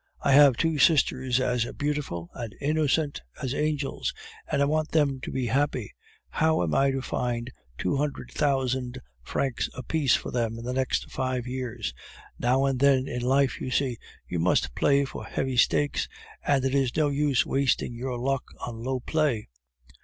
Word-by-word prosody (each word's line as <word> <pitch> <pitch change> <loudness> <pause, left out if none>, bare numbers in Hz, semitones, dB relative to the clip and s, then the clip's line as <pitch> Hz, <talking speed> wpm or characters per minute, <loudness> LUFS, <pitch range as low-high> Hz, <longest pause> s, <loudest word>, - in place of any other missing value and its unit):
I 140 - +3
have 140 -3 +7
two 160 -2 +1
sisters 130 -4 +3
as 125 -2 0
beautiful 145 - -3
and 115 -4 -6
innocent 150 0 +1 0.2
as 130 -1 -2
angels, 150 -1 -1 0.4
and - - +1
I 140 - +4
want 155 +1 0
them 145 -4 +2
to - - -5
be 130 -2 -1
happy. 140 +5 0 0.4
How 160 - +2
am 80 - -1
I 135 0 +4
to 135 -1 -2
find 120 -1 -2 0.3
two 90 - 0
hundred 140 -3 -3
thousand 130 -3 0 0.2
francs 130 - -1
apiece 135 +2 +1
for - - -4
them 115 -2 -1
in 115 - -7
the 125 - -2
next 130 0 -1
five 130 -2 -2
years? 125 - -4 0.5
Now 130 +3 +2
and 135 -2 0
then 135 -1 +4
in 125 - -3
life, 135 +2 +2
you - - -3
see, 130 -3 0 0.3
you 85 - -2
must 80 -7 +2
play 140 - +3
for 135 - -7
heavy 130 -1 -2
stakes, 75 -11 +2 0.3
and 135 -2 +2
it 135 - 0
is 135 -2 +1
no 150 -2 +3
use 140 -2 +2
wasting 135 -3 +1
your 125 +1 -4
luck 135 +2 -1 0.2
on 115 -2 -7
low 130 0 -2
play." 145 -8 0
130 Hz, 175 wpm, -27 LUFS, 125-140 Hz, 0.5 s, have